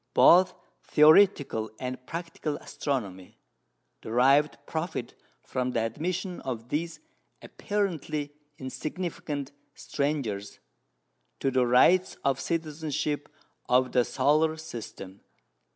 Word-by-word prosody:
Both 180 +1 +6 0.3
theoretical 150 - +4
and 125 0 -5
practical 165 -2 -4
astronomy 100 -10 -4 0.6
derived 135 +6 +3
profit 160 +2 -4 0.3
from 125 0 -2
the 115 - +1
admission 175 - -3
of 120 -2 -5
these 165 +3 -3 0.4
apparently 160 -8 -3 0.2
insignificant 145 0 -5 0.2
strangers 130 -9 -3 0.8
to 135 - 0
the 125 -1 +2
rights 175 +10 +4
of 135 -1 +1
citizenship 155 -3 -3 0.4
of 130 +1 +3
the 125 - +3
solar 155 +5 +2
system. 115 -10 -9
145 Hz, 90 wpm, -28 LUFS, 125-160 Hz, 0.8 s, Both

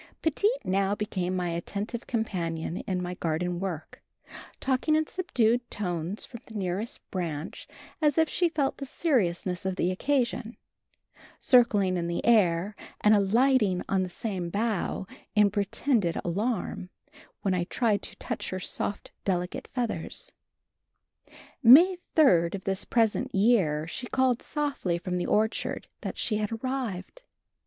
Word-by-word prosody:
Petite 365 - +1
now 195 +1 +1
became 185 -4 -2
my 180 -1 -1
attentive 200 +7 -4
companion 175 -7 -2
in 180 -1 -1
my 180 0 -3
garden 175 +1 -2
work, 180 -5 -5 0.6
talking 270 +4 +1
in 315 0 +2
subdued 245 -10 0
tones 180 -1 -3
from 235 - -10
the 225 - -12
nearest 195 +3 -3
branch 165 -3 -4 0.3
as 295 -2 +3
if 320 0 +4
she 350 +2 +1
felt 290 -4 0
the 275 - -5
seriousness 190 - 0
of 190 -1 -1
the 180 -1 +1
occasion, 240 +1 -1 0.8
circling 205 -7 +4
in 170 -1 -2
the 170 - -2
air 195 -4 +3 0.3
and 210 - +5
alighting 210 -1 +3
on 195 -1 +1
the 185 - -2
same 180 -2 -3
bough 205 -1 -1 0.3
in 210 -1 +5
pretended 205 -1 0
alarm 195 0 -2 0.5
when 195 - +1
I 180 -1 0
tried 210 0 +1
to - - -8
touch - - -5
her 185 - -3
soft, 200 +2 -3
delicate 180 -2 -2
feathers. 250 - -2 1.3
May 335 +10 +8 0.2
3d 175 - +5
of 190 - -7
this 195 0 -2
present 235 +3 +1
year 195 -8 +3
she 245 +9 -6
called 260 -2 +2
softly 285 - -1
from 180 +1 -3
the 175 - -2
orchard 220 +1 0
that - - -5
she 215 - 0
had 210 0 -2
arrived. 240 - -4
205 Hz, 140 wpm, -28 LUFS, 180-245 Hz, 1.3 s, May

